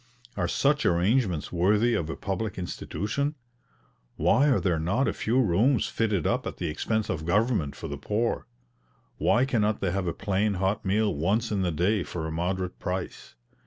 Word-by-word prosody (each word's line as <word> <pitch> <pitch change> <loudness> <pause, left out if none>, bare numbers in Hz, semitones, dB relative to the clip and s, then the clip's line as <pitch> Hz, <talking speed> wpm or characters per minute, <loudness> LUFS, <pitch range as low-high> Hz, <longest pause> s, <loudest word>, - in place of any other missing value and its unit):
Are - - 0
such 150 +1 +2
arrangements 90 - +1
worthy 105 +7 +3
of 80 -6 -1
a - - -3
public 95 +1 -3
institution? 105 - -3 0.8
Why 115 - +3
are 135 - +3
there 85 -4 0
not 100 +12 +1
a - - 0
few 120 +4 0
rooms 115 +4 +3
fitted 105 -7 0
up - - 0
at - - -6
the 85 - -2
expense 110 +7 -1
of 80 - -3
government 95 - +1
for - - -7
the 70 0 -6
poor? 105 - -1 0.7
Why 120 +3 +3
cannot 110 -5 +1
they 95 - 0
have 95 0 -1
a - - +1
plain 100 +2 0
hot 95 +3 0
meal 105 +1 +1
once 105 +10 0
in 100 -2 0
the 90 -2 +1
day 90 +6 +1
for 85 -2 -4
a 80 - -3
moderate 90 +2 -2
price? 90 0 -5
100 Hz, 180 wpm, -27 LUFS, 85-110 Hz, 0.8 s, worthy